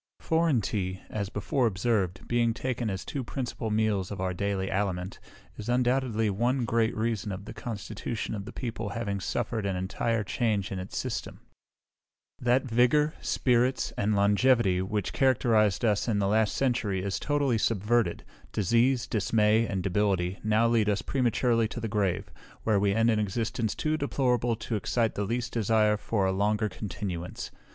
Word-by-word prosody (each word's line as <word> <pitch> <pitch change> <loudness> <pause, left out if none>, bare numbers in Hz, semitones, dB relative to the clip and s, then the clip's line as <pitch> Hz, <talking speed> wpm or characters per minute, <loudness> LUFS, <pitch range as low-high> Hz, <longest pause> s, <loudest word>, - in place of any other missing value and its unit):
Foreign 160 -7 +2
tea, 95 -2 -2
as 100 -3 -3
before 130 +2 0
observed, 95 -3 -1
being 120 -1 +1
taken 125 -3 -2
as 95 -1 -4
two 140 - -4
principal 120 -2 -4
meals 105 -3 +1
of 100 - -6
our 95 0 -1
daily 100 0 -1
aliment, 95 -1 -2 0.4
is 105 +2 -6
undoubtedly 125 -2 +1
one 120 +5 +1
great 115 -1 +1
reason 110 -2 -1
of 95 +1 -6
the - - -8
constitution 110 0 -5
of 100 -2 -5
the - - -7
people 115 -4 -4
having 100 -4 -2
suffered 115 +2 -2
an 100 -1 -1
entire 105 +4 -1
change 105 -2 -1
in 95 - -3
its 95 +1 -6
system. - - -4 1.0
That 125 +2 +2
vigour, 130 +6 +3
spirits, 125 +1 +1
and 105 +1 +1
longevity, 100 -1 +3
which 100 +1 -2
characterised 115 -6 +3
us 105 0 +1
in 110 -3 +1
the 100 -1 +1
last 110 +1 +2
century, 115 -8 0
is 100 -1 -2
totally 140 -5 +1
subverted; 105 -3 +1 0.3
disease, 120 +5 +2
dismay, 110 +1 +2
and 95 -3 -2
debility, 95 -1 0
now 110 +2 +3
lead 115 -2 +2
us 100 -1 0
prematurely 120 -3 +1
to 120 - -6
the 115 - -3
grave, 100 -4 -1 0.3
where 110 -3 +2
we 100 0 +2
end 115 +1 +4
an 110 - +1
existence 110 +2 -1
too 155 0 0
deplorable 125 -5 +1
to 110 - -4
excite 115 +2 0
the 100 - -2
least 120 +3 -2
desire 110 -1 +3
for 105 -1 -1
a 95 - +2
longer 105 +3 +1
continuance. 90 -2 -5
110 Hz, 165 wpm, -28 LUFS, 100-120 Hz, 1.0 s, end